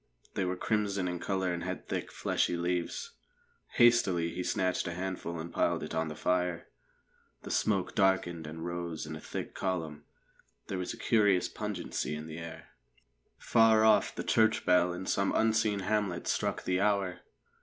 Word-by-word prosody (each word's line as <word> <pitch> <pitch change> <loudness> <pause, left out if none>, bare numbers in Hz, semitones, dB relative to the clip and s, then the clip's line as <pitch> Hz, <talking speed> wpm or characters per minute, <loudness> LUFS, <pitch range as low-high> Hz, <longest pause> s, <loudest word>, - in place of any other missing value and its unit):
They 95 - -1
were 90 0 -1
crimson 100 -1 0
in 90 -1 -3
colour 95 -1 -1
and 85 - -4
had - - -5
thick, - - -3
fleshy 85 - 0
leaves. 90 - -2 0.6
Hastily, 100 -9 +4
he 90 - -3
snatched 90 0 0
a 85 - -4
handful 90 -2 -4
and 85 +1 -7
piled - - +1
it - - -6
on 80 0 0
the 80 - -6
fire. 90 -1 0 0.8
The - - -6
smoke 100 -4 +1
darkened 90 -5 +1
and 80 +2 -6
rose 85 -2 -4
in 80 +1 -6
a - - -7
thick - - -6
column; 80 -6 -3 0.6
there 95 - -2
was 90 - -3
a - - -7
curious 105 -5 +3
pungency - - -3
in 75 +1 -6
the 80 +1 -7
air. 80 -1 -9 0.7
Far 110 -1 +4
off 110 - +4
the - - -3
church 110 0 +3
bell 90 0 +4
in 90 +2 -5
some 100 +1 +1
unseen 110 -2 +2
hamlet 100 -3 -1
struck - - -1
the 90 +1 0
hour. 100 -3 +1
90 Hz, 170 wpm, -31 LUFS, 85-100 Hz, 0.8 s, Hastily